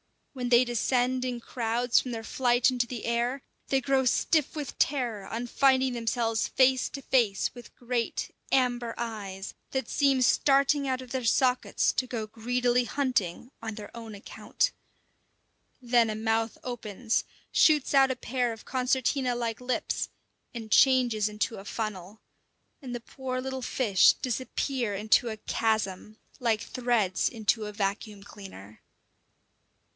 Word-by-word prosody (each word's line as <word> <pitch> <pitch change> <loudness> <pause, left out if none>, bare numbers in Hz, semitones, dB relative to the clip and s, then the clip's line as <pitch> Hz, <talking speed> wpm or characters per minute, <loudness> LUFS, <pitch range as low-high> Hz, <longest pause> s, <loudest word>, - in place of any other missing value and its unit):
When 250 -2 -3
they 240 +1 +6
descend 250 +1 0
in 245 -2 -3
crowds 235 +1 +1
from 255 - -5
their 225 -1 -5
flight 245 +2 +2
into 245 -1 0
the 235 -2 -6
air, 240 +3 -1 0.2
they 270 -1 +1
grow 270 0 +1
stiff 300 +4 +2
with 295 -3 -6
terror 240 -8 0
on 230 +4 -4
finding 260 +1 +3
themselves 230 -1 0
face 260 0 +3
to 275 - -7
face 230 -7 +1
with 245 -1 -13
great, 240 -1 -3 0.2
amber 245 -3 +1
eyes 205 -5 -5 0.2
that 265 0 -2
seem 275 -3 +3
starting 280 +2 +3
out 260 -1 -1
of 255 -1 -11
their 260 -2 -2
sockets 250 +2 +2
to 255 - -1
go 230 -3 -3
greedily 245 +3 0
hunting 250 -5 -1
on 225 -1 -5
their 210 +1 -10
own 225 -2 -8
account. 355 - -2 1.1
Then 240 -2 +3
a 215 - -2
mouth 225 +1 -1
opens, 230 -2 -2 0.3
shoots 300 -3 +4
out 270 -1 +6
a 260 - -1
pair 245 -1 -1
of 225 - -13
concertina 255 0 0
like 235 -1 -3
lips, 250 0 -2 0.5
and 225 -2 -7
changes 245 -5 +4
into 210 +2 -2
a 195 - -10
funnel; 210 -2 -5 0.6
and 250 -3 -6
the 240 - -5
poor 255 +1 -5
little 265 0 -4
fish 225 -6 +4
disappear 255 -2 -2
into 215 +4 +3
a 220 - -5
chasm, 215 -2 -2 0.2
like 230 -3 +1
threads 235 -6 0
into 220 -1 0
a 210 - -7
vacuum 205 0 -3
cleaner. 190 - -12
240 Hz, 145 wpm, -28 LUFS, 220-255 Hz, 1.1 s, they